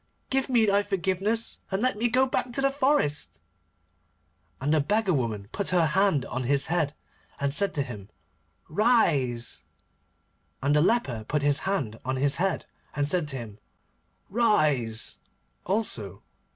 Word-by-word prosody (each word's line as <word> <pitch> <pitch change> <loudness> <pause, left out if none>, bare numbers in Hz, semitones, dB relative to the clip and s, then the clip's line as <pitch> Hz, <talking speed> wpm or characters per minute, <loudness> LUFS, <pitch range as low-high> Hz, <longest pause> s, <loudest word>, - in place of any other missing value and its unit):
Give 270 0 +1
me 235 -3 +4
thy 200 0 +3
forgiveness, 200 +3 -1
and 190 0 -1
let 255 +3 +1
me 235 +3 0
go 255 +3 +4
back 250 -1 -2
to 275 - +1
the 275 0 +3
forest.' 150 - +1 1.2
And 145 +4 0
the 155 - +4
beggar 205 +4 +1
woman 110 -7 -2
put 200 - -2
her 175 -2 +3
hand 160 -3 +2
on 130 0 -4
his 140 +2 +2
head, 160 -4 0 0.4
and 140 0 0
said 200 +6 +1
to 140 - +1
him, 105 -7 -9 0.6
'Rise,' 155 - +2 1.0
and 140 +2 +1
the 150 - +5
leper 150 - +1
put 150 -1 0
his 145 +1 +3
hand 125 - -2
on 130 +1 -1
his 140 +1 +1
head, 190 -1 0 0.3
and 145 -1 0
said 170 0 0
to 140 - -5
him, 110 -3 -8 0.7
'Rise,' 150 - +1 0.5
also. 120 - -2
155 Hz, 150 wpm, -27 LUFS, 130-210 Hz, 1.2 s, the